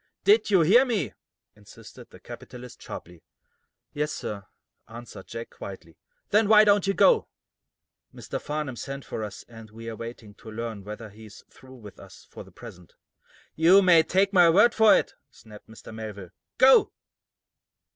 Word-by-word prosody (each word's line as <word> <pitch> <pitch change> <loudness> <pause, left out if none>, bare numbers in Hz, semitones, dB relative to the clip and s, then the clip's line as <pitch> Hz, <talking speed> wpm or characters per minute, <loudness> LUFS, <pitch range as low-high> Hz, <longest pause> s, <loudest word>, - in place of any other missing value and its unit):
"Did 420 - +3
you 190 -4 +4
hear 210 +11 +5
me?" 225 - -3 0.4
insisted - - -15
the - - -16
capitalist, 125 0 -12
sharply. 85 -1 -10 0.7
"Yes, 150 +1 -2
sir," 100 -2 -7 0.4
answered 115 -3 -12
Jack, 115 0 -8
quietly. 85 -4 -11 0.4
"Then 210 +1 +3
why 215 -1 +7
don't 205 -2 +2
you 195 - 0
go?" 470 -3 +3 0.8
"Mr. - - -7
Farnum 150 -3 -5
sent 135 +2 -7
for 110 - -6
us, 105 -1 -9
and 115 -2 -14
we 115 +2 -12
are - - -8
waiting 115 -2 -10
to 110 +2 -14
learn 110 -2 -7
whether 105 +1 -9
he 110 +2 -15
is 100 - -15
through 130 0 -16
with 105 -6 -14
us - - -15
for - - -10
the - - -19
present." 90 -1 -14 0.6
"You 180 +5 +5
may 175 -3 +6
take 195 +4 0
my 175 -3 +6
word 205 +8 +4
for 220 -1 +5
it," - - -3 0.2
snapped 105 -1 -17
Mr. 110 0 -13
Melville. 105 -5 -9 0.3
"Go!" 265 +1 +5
120 Hz, 165 wpm, -25 LUFS, -, 0.8 s, why